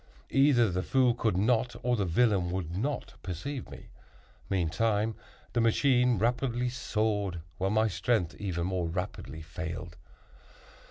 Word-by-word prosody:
Either 135 Hz, -4 st, +5 dB
the 90 Hz, +1 st, 0 dB
fool 125 Hz, +3 st, +3 dB
could 110 Hz, -5 st, 0 dB
not, 120 Hz, +3 st, +2 dB
or 125 Hz, 0 st, +2 dB
the 100 Hz, -4 st, 0 dB
villain 95 Hz, -1 st, +2 dB
would 90 Hz, -2 st, -3 dB
not 135 Hz, +7 st, -2 dB
perceive 115 Hz, -, -5 dB
me. -, -, -11 dB, 0.6 s
Meantime 105 Hz, +5 st, +1 dB, 0.4 s
the 120 Hz, -, +2 dB
machine 125 Hz, +1 st, +3 dB
rapidly 125 Hz, +3 st, 0 dB
soared, 105 Hz, -6 st, -1 dB, 0.2 s
while 95 Hz, +1 st, +1 dB
my 110 Hz, +2 st, +3 dB
strength 100 Hz, -4 st, 0 dB
even 85 Hz, -4 st, -2 dB
more 90 Hz, -2 st, -1 dB
rapidly 85 Hz, -2 st, -5 dB
failed. 85 Hz, +1 st, -6 dB
105 Hz, 130 wpm, -30 LUFS, 90-120 Hz, 0.6 s, Either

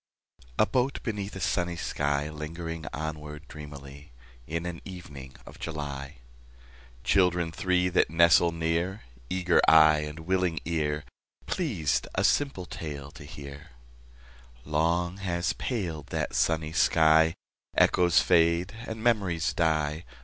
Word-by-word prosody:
A -, -, +5 dB
boat 130 Hz, +2 st, -1 dB
beneath 105 Hz, -3 st, -4 dB
a -, -, -5 dB
sunny 90 Hz, -1 st, 0 dB
sky, 70 Hz, -3 st, -1 dB
Lingering 80 Hz, +1 st, -6 dB
onward 75 Hz, 0 st, -6 dB
dreamily 70 Hz, -1 st, -11 dB, 0.4 s
In 85 Hz, +2 st, -3 dB
an 85 Hz, -1 st, -5 dB
evening 70 Hz, -8 st, -10 dB
of -, -, -13 dB
July— 70 Hz, -3 st, -5 dB, 0.9 s
Children 90 Hz, -3 st, +2 dB
three 90 Hz, +1 st, +1 dB
that 90 Hz, -, +2 dB
nestle 85 Hz, +1 st, +5 dB
near, 85 Hz, +4 st, -1 dB, 0.3 s
Eager 90 Hz, -1 st, +2 dB
eye 80 Hz, -1 st, +7 dB
and 75 Hz, +2 st, -6 dB
willing 90 Hz, -1 st, 0 dB
ear, 75 Hz, -2 st, -1 dB, 0.4 s
Pleased 105 Hz, -, -1 dB
a -, -, +1 dB
simple 140 Hz, -11 st, +1 dB
tale 70 Hz, -4 st, -7 dB
to 75 Hz, -, -12 dB
hear— 70 Hz, +1 st, -10 dB, 0.9 s
Long 85 Hz, +4 st, 0 dB
has 90 Hz, -3 st, -1 dB
paled 85 Hz, -, -4 dB
that -, -, -3 dB
sunny 80 Hz, -1 st, +1 dB
sky: 80 Hz, -1 st, +4 dB, 0.4 s
Echoes 90 Hz, -2 st, +5 dB
fade 85 Hz, +3 st, +3 dB
and 110 Hz, 0 st, -6 dB
memories 95 Hz, -9 st, +1 dB
die. 80 Hz, -1 st, 0 dB
80 Hz, 120 wpm, -28 LUFS, 75-90 Hz, 0.9 s, eye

